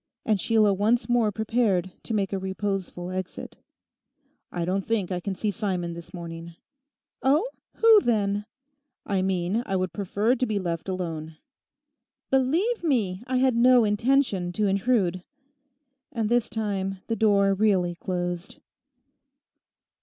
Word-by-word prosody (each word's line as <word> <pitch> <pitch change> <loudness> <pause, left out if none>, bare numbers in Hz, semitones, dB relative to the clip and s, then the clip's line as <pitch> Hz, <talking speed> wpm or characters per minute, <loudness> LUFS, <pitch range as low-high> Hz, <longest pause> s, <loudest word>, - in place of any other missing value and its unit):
And 210 -4 +1
Sheila 220 -3 +3
once 220 +6 +1
more 240 -3 +2
prepared 210 -4 0
to 225 - -2
make 200 -2 -1
a 195 - -1
reposeful 190 -2 -3
exit. 185 0 -6 0.9
'I 175 -1 -2
don't 190 +2 0
think 210 -5 0
I 180 - -1
can 190 +2 -4
see 210 +3 -1
Simon 185 -5 -2
this 170 0 -10
morning.' 170 -1 -8 0.7
'Oh. 295 - +3 0.3
Who, 450 -2 +6
then?' 205 - 0 0.6
'I 195 -2 0
mean 190 +4 0
I 195 - -1
would 185 -3 -1
prefer 205 +5 0
to 255 0 0
be 215 -2 -1
left 170 -2 -3
alone.' 165 -4 -4 0.9
'Believe 330 - +1
me, 220 - 0
I 255 0 0
had 255 -1 +3
no 245 0 +6
intention 210 -3 +1
to 210 +3 0
intrude.' 195 -2 +1 0.9
And 225 -6 -1
this 240 -1 +2
time 195 -3 -2
the 225 - -1
door 200 -2 +3
really 190 -4 +2
closed. 175 +1 -4
200 Hz, 140 wpm, -26 LUFS, 185-230 Hz, 0.9 s, Who